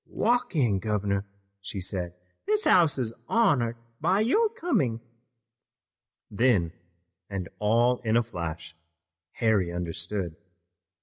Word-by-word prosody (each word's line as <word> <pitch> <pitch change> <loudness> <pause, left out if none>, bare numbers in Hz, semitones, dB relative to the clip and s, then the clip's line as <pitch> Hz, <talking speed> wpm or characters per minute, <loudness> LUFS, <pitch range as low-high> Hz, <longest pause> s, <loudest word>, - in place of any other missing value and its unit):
"Walk 240 -4 0
in, 115 -10 +2
governor," 100 -1 -1 0.3
she 100 0 -5
said. 90 -1 -4 0.3
"This 425 0 +2
house 165 -6 +5
is 120 -4 -1
honored 125 - +2 0.2
by 185 +6 +2
your 425 - +3
coming." 325 - 0 1.3
Then, 105 -7 +2 0.6
and 95 -3 -4
all 120 +4 +3
in 115 -1 +1
a 120 - +3
flash, 85 -6 -6 0.6
Harry 105 -7 +1
understood. 85 0 -4
110 Hz, 110 wpm, -27 LUFS, 95-145 Hz, 1.3 s, house